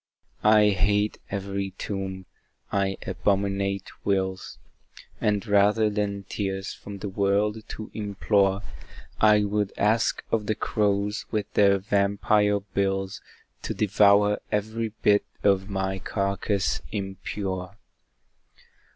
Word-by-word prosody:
I 105 -1 +6
hate 105 +2 +1
every 100 -1 -3
tomb 95 -2 -4 0.5
I 95 -1 0
abominate 100 0 0 0.2
wills, 95 -1 -1 0.6
And 105 0 0
rather 105 +1 +3
than 100 -1 -2
tears 95 0 -3
from 100 0 -9
the 100 - -5
world 100 +2 +1
to 110 - -8
implore, 100 -1 +1 0.6
I 105 -1 +5
would 105 -1 0
ask 110 +3 +2
of 105 -2 0
the 110 - +1
crows 105 0 0
with 105 -2 -3
their 100 -1 +5
vampire 100 +1 +2
bills 95 -1 -2 0.4
To - - -4
devour 105 0 +4
every 110 +2 -1
bit 105 0 +5 0.2
of 100 0 +2
my 95 -1 -2
carcass 100 -2 -1
impure. 95 -1 -4
100 Hz, 110 wpm, -26 LUFS, 95-105 Hz, 0.6 s, I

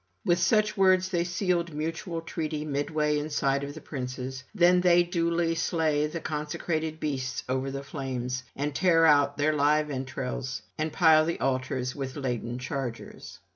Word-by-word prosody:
With 175 0 +3
such 210 +4 +2
words 185 -2 +4
they 175 -2 +1
sealed 175 -2 -1
mutual 165 +2 -3
treaty 155 -2 -4
midway 150 +1 0
in 150 +1 -4
sight 140 -2 +1
of 145 +1 -6
the 160 - -9
princes. 130 -1 -5
Then 180 -1 +5
they 175 -1 +5
duly 170 -1 0
slay 160 -3 +1
the 170 +2 -5
consecrated 155 +1 -3
beasts 130 -3 -3
over 130 +1 -1
the 140 +1 -5
flames, 130 -3 -4
and 145 +1 -2
tear 165 +1 +4
out 145 -2 +4
their 150 +2 +2
live 150 +1 +2
entrails, 130 -3 -4
and 155 0 -2
pile 160 -3 +5
the 170 +1 -2
altars 130 -1 -1
with 135 -2 -5
laden 120 -4 -3
chargers. 125 -2 -6
150 Hz, 160 wpm, -28 LUFS, 135-165 Hz, -, Then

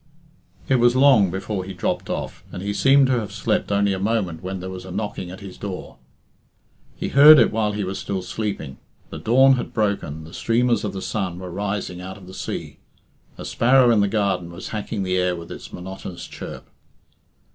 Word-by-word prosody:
It 130 - +3
was 120 0 +4
long 130 -8 +6
before 95 +1 -3
he 95 0 -8
dropped 85 - -2
off, - - -4
and 90 - -6
he 100 0 -2
seemed 135 +5 +5
to 130 -2 +2
have 105 - -5
slept - - -1
only 100 0 +2
a 95 - -3
moment 100 -5 -1
when 95 +1 -4
there 95 +1 -6
was 90 -1 -7
a 95 - -10
knocking 95 -1 -4
at 95 +3 -9
his 95 -2 -10
door. 95 -10 -6 1.0
He - - -4
heard 150 +2 +9
it 115 - +5
while 105 -1 0
he 105 0 -2
was 95 +1 -4
still 95 -2 -3
sleeping. 90 -8 -4 0.3
The - - -6
dawn 130 +3 +5
had 120 - -5
broken, 100 -8 -1
the 80 +2 -12
streamers 120 -1 +1
of 105 - -3
the 95 - -5
sun 95 -5 -3
were 90 -1 -7
rising 100 -1 -3
out 95 +2 -7
of 100 - -14
the 95 - -11
sea. - - -6 0.6
A - - -7
sparrow 125 0 +4
in 115 - +4
the 100 - +3
garden 95 -5 -1
was 85 - -8
hacking 105 -1 -3
the 95 0 0
air 90 -1 +1
with 85 -1 -9
its - - -9
monotonous 90 -1 -8
chirp. - - -9
100 Hz, 205 wpm, -22 LUFS, 90-115 Hz, 1.0 s, heard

